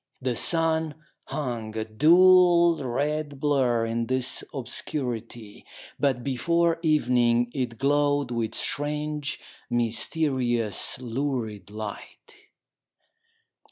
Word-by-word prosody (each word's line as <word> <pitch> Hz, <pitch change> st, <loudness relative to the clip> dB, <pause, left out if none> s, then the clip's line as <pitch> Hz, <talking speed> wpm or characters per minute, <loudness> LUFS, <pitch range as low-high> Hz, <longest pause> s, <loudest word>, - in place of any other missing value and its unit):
The 125 Hz, -2 st, -2 dB
sun 160 Hz, +1 st, +2 dB, 0.3 s
hung, 115 Hz, -6 st, -4 dB
a 110 Hz, -, -2 dB
dull 170 Hz, +5 st, +5 dB
red 145 Hz, +3 st, -2 dB
blur 130 Hz, -6 st, +1 dB
in 115 Hz, 0 st, -2 dB
this 130 Hz, -1 st, -1 dB
obscurity; 120 Hz, -5 st, -5 dB, 0.4 s
but 130 Hz, -4 st, +1 dB
before 165 Hz, +5 st, +1 dB
evening 120 Hz, -6 st, +2 dB
it 125 Hz, -4 st, -3 dB
glowed 145 Hz, 0 st, +1 dB
with 115 Hz, -2 st, -2 dB
strange, 150 Hz, 0 st, -2 dB, 0.3 s
mysterious, 120 Hz, -, 0 dB
lurid 120 Hz, -6 st, -4 dB
light. 110 Hz, -, -8 dB
130 Hz, 85 wpm, -26 LUFS, 120-150 Hz, 0.4 s, dull